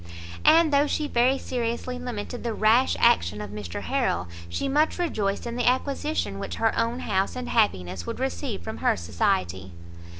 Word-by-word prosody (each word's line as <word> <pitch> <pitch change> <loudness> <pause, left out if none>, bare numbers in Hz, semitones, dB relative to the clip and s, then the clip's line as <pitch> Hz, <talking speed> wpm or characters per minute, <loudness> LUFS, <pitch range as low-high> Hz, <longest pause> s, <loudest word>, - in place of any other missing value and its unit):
And 325 -2 +5
though 285 +1 +4
she 300 0 -1
very 255 +1 +3
seriously 245 0 -3
lamented 245 -1 -5
the 230 -2 -2
rash 225 +5 +3
action 85 +4 +3
of 105 -1 -6
Mr 105 -5 -6
Harrel, 90 +1 0 0.2
she 85 - -2
much 300 +3 +2
rejoiced 215 - -1
in 235 0 -4
the 245 - +3
acquisition 270 - -1
which - - -4
her 225 -1 +1
own 235 +2 0
house 190 +1 0
and 250 -1 -5
happiness 90 - 0
would - - -4
receive 85 +1 -3
from - - -6
her - - +1
society. 90 +2 -1
230 Hz, 170 wpm, -25 LUFS, -, 0.2 s, And